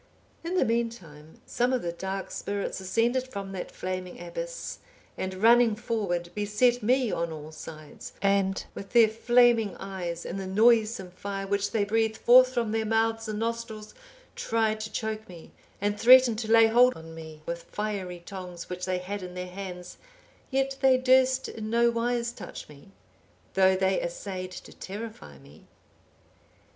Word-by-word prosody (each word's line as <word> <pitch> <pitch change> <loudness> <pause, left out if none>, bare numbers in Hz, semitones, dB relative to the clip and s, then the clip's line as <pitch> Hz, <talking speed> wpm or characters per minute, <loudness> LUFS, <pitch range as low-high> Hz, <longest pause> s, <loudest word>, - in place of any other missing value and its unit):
In 340 +2 -3
the - - +3
meantime, 190 -10 -4
some 245 +1 0
of 255 -2 0
the 170 - -2
dark 190 +2 -5
spirits 200 -1 -3
ascended 230 +7 0
from 200 -5 -6
that 190 -2 -5
flaming 185 -1 -5
abyss, - - -6 0.4
and 190 0 -4
running 230 +2 +5
forward, 200 -7 -2
beset 210 +4 +2
me 250 +1 +2
on 170 0 -2
all 155 0 -8
sides, 155 -1 -10
and 195 -1 +1
with 200 - -9
their 235 -2 +7
flaming 230 -1 +3
eyes 180 -3 -5
and 195 - -4
the 190 - -5
noisome 215 -1 +3
fire 195 +2 -5
which 200 0 0
they 220 -3 +1
breathed 220 +1 0
forth 255 +1 +6
from 235 -4 -1
their 225 0 0
mouths 225 +1 0
and 215 -1 -3
nostrils, 230 -1 -4 0.4
tried 220 -1 0
to 215 0 -5
choke 220 0 -4
me; 170 -3 -12 0.3
and 205 +1 -1
threatened 250 -2 +7
to 220 -1 -3
lay 225 0 +8
hold 245 +3 +5
on 160 0 -11
me 160 -1 -10
with 170 0 -4
fiery 195 -4 -4
tongs, 180 -3 -8
which 180 0 -4
they 185 -1 -1
had 195 +3 -5
in 180 -1 -8
their 180 0 -4
hands, 180 -2 -8 0.5
yet 270 0 0
they 265 -1 +5
durst 260 0 +3
in 215 -1 -6
no 235 +1 +3
wise 235 0 -1
touch 245 - -9
me, 145 +4 -15 0.7
though 190 0 +4
they 190 0 +1
assayed 185 +1 -5
to 185 - -11
terrify 200 - -8
me. 70 +3 -18
210 Hz, 165 wpm, -27 LUFS, 185-235 Hz, 0.7 s, lay